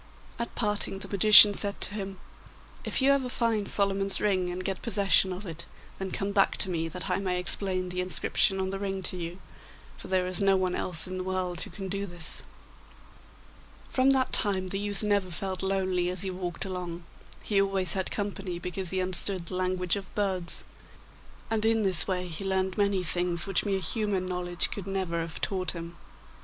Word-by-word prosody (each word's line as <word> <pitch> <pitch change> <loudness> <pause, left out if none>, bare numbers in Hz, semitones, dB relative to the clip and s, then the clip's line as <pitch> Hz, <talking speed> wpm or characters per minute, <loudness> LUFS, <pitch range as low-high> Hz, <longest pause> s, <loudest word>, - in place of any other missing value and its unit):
At 235 - -4
parting 210 -3 +1
the 195 0 -6
magician 210 +1 +9
said 200 0 -2
to - - +1
him. 195 -2 -5 0.7
'If - - 0
you 275 - +5
ever 270 -2 +1
find 230 -5 0
Solomon's 195 -1 +3
ring 185 -4 +1
and 180 +1 -5
get 195 -1 -2
possession 200 -4 +3
of 185 +3 -6
it, 170 -2 -7 0.3
then 190 0 -3
come 195 +2 -3
back 200 -1 +2
to 190 - +1
me, 165 -1 -1
that 180 +3 -6
I 180 -1 +1
may 185 -2 -1
explain 185 0 -2
the 180 0 -2
inscription 190 +2 +2
on 190 0 -1
the 195 - -4
ring 195 -1 -3
to 180 - -1
you, 175 0 -5 0.6
for - - -10
there 185 -1 +1
is 185 +1 -1
no 195 -1 +4
one 185 -1 0
else 170 -4 -2
in 185 0 -5
the - - -3
world 185 -2 -2
who - - -4
can 195 -2 -7
do 200 +1 -3
this.' 175 -3 -1 1.5
From 260 +1 +3
that 265 -1 +2
time 190 -3 +3
the 195 - -2
youth 205 0 -1
never 205 -3 +1
felt 185 +2 -3
lonely 190 -2 0
as 180 +1 -2
he 190 - -2
walked 180 -1 -4
along; 180 -2 -5 0.4
he 200 -2 +2
always 195 -3 +4
had 190 -1 0
company, 195 -3 -4
because 180 +1 -3
he 185 +1 0
understood 185 0 -2
the 185 - -3
language 185 -1 0
of 195 -2 -8
birds; 190 -4 -2 0.9
and 220 -1 +1
in 225 0 +2
this 185 -4 +1
way 180 -2 -1
he 165 +2 -5
learned 190 -1 0
many 200 -2 +1
things 175 0 -1
which 195 0 0
mere 195 -1 0
human 195 +1 0
knowledge 180 -1 -1
could 195 -2 -6
never 190 -3 -2
have 165 0 -6
taught 185 -4 -1
him. 170 0 -8
190 Hz, 195 wpm, -28 LUFS, 180-200 Hz, 1.5 s, magician